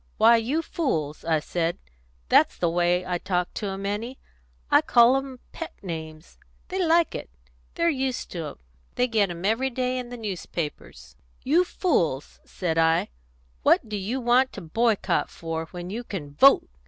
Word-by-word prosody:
'Why, 230 +2 +6
you 270 +9 -1
fools,' 155 - -2 0.2
said 170 +2 -1
I 65 - -33 0.4
that's - - +4
the 170 -2 +1
way 175 +1 +1
I 180 -1 -2
talk 180 -1 -1
to 210 - -4
'em, 195 0 -4
Annie; 225 +6 -3 0.5
I - - +7
call 240 +2 +5
'em 270 -2 -4
pet 330 - -7
names; 160 -2 -7 0.3
they 375 0 -1
like 335 0 +3
it; - - -6 0.5
they're 335 - +1
used 265 -5 -1
to 170 -3 -4
'em; 145 - -8 0.4
they 250 - +2
get 215 -5 +2
'em 175 +1 -6
every 230 +6 +1
day 255 0 -1
in 245 -1 -6
the 245 - -7
newspapers 165 - -6 0.3
'you 325 +7 +4
fools,' 170 - -1
said 165 -3 -2
I, 165 0 +3 0.5
'what 225 - +3
do 215 - -4
you 205 +7 -2
want 250 +2 +3
to - - -7
boycott 220 +6 +1
for, 165 -1 -5
when 175 +2 -7
you 235 +4 -4
can 155 -11 -7
vote? 275 - +6
205 Hz, 170 wpm, -25 LUFS, 170-255 Hz, 0.5 s, I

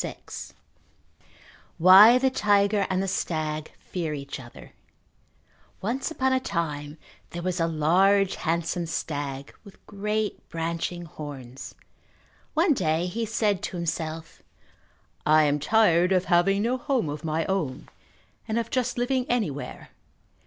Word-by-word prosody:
VI - - -5 1.6
Why 195 +8 +9
the 265 +1 +2
Tiger 205 -3 +2
and 190 0 0
the - - -2
Stag 155 -4 -2
Fear 165 -4 -4
Each 140 -1 -7
Other 120 -2 -13 1.1
Once 240 +7 -2
upon 265 -5 0
a 260 - +3
time 155 - -3 0.3
there 170 0 -6
was 185 0 -2
a 165 - +2
large 185 +5 +3
handsome 170 +1 -1
stag 145 -4 -4
with 200 -3 -17
great 210 +1 -3
branching 170 +1 -3
horns. 140 -5 -9 0.8
One 325 +1 +4
day 165 - 0
he 225 +5 -3
said 210 -3 0
to 180 - -4
himself, 160 -1 -4 0.8
"I 155 0 +5
am 145 0 +1
tired 180 +1 +3
of 185 -1 +2
having 195 +4 +3
no 245 +3 +1
home 250 - 0
of 145 +1 -5
my 160 0 -1
own, 165 -9 -2 0.6
and 220 - -1
of 230 0 -2
just 255 -2 -1
living 250 +1 0
anywhere. 195 - -3
180 Hz, 130 wpm, -26 LUFS, 155-210 Hz, 1.6 s, Why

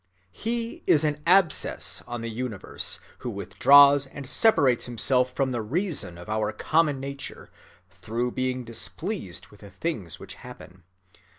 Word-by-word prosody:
(14) - - -16
He 230 +1 -3
is 150 - +5
an 150 -1 -1
abscess 180 -3 +3
on 120 -1 -5
the 115 - -4
universe 115 -3 -4 0.2
who - - -5
withdraws 140 0 +5
and 140 +1 -9
separates 140 - +3
himself 125 +2 +1
from 135 0 -1
the 120 -2 -2
reason 145 - -2
of 85 - -11
our 110 0 -1
common 150 +4 +1
nature, 140 +1 -7 0.4
through 120 +3 -3
being 130 0 -2
displeased 120 - -4
with 105 - -18
the 100 - -12
things 100 - -4
which - - -9
happen. 90 -1 -13
130 Hz, 150 wpm, -26 LUFS, 115-150 Hz, 0.4 s, is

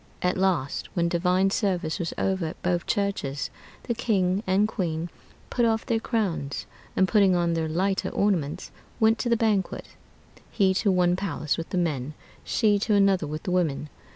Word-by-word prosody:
At 180 - +2
last, 180 -8 0
when 170 -2 +2
divine 180 +3 +2
service 185 -6 0
was 170 -2 -2
over 190 -3 0
at 155 - -8
both 175 -1 0
churches, 150 -9 -1 0.3
the 235 - -1
king 200 -5 +1
and 195 +3 +3
queen 170 -5 -3 0.4
put 240 - +1
off 225 -1 +1
their 230 -3 +1
crowns, 195 - -2 0.3
and 190 - +3
putting 195 -3 +4
on 170 -1 +1
their 160 -1 -1
lighter 190 +4 0
ornaments, 180 -5 -1 0.3
went 220 -1 +4
to 240 - -1
the 235 - +3
banquet, 215 -4 0 0.6
he 195 -3 +2
to 195 +1 +2
one 180 -1 +3
palace 165 -6 -2
with 165 - -6
the - - -2
men, 150 -5 -1 0.3
she 210 -3 +2
to 210 +1 +1
another 195 -5 +3
with 155 +1 -5
the 180 - -3
women. 155 -5 0
185 Hz, 175 wpm, -26 LUFS, 165-200 Hz, 0.6 s, putting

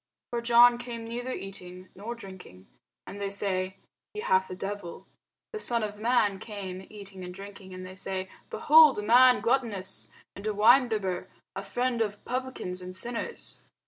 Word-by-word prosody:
For 240 -1 -1
John 240 +1 +6
came 240 -2 -6
neither 245 +3 -4
eating 185 -3 -8
nor 220 +5 -6
drinking, 190 - -12 0.4
and 200 - -8
they 200 - -1
say, 190 -1 -1 0.4
He 425 - -3
hath 190 - +2
a 185 - -5
devil. 195 -2 -6 0.5
The 435 - -3
Son 235 - 0
of 210 -1 -5
man 215 -4 +2
came 190 -3 -7
eating 200 -3 -10
and 180 - -6
drinking, 195 0 -10
and 185 0 -7
they 185 - -9
say, 190 0 -3 0.2
Behold 310 -2 +7
a 210 - -2
man 250 +2 +6
gluttonous, 220 -5 -1 0.3
and 200 +2 -6
a 215 - -1
winebibber, 215 -4 +3 0.3
a - - -4
friend 245 -1 -1
of 205 -2 -2
publicans 250 -8 -4
and 180 0 -8
sinners. 240 - -6
205 Hz, 165 wpm, -28 LUFS, 190-240 Hz, 0.5 s, Behold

